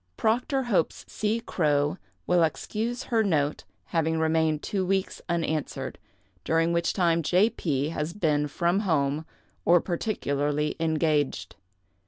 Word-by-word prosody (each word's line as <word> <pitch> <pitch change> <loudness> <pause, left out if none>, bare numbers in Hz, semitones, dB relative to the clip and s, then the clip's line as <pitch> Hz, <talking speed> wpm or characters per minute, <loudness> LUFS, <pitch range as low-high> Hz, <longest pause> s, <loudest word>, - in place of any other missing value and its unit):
Proctor 250 +5 +1
hopes 205 -9 0
C. 215 +2 -1
Crowe 150 -5 0 0.3
will 180 -1 +3
excuse 220 +8 -1
her 230 -3 +1
note 150 -7 0 0.3
having 160 -1 +1
remained 160 -1 +1
two 195 -2 -1
weeks 190 +1 -1
unanswered, 160 -3 -2 0.4
during 165 +1 +2
which 170 0 +1
time 170 -3 +2
J. 180 +8 +3
P. 145 -3 -1
has 155 0 -3
been 150 -6 +1
from 170 +6 +1
home, 155 -5 0 0.4
or 175 +1 +5
particularly 150 -6 -1
engaged. 155 -3 0
165 Hz, 125 wpm, -27 LUFS, 150-195 Hz, 0.4 s, or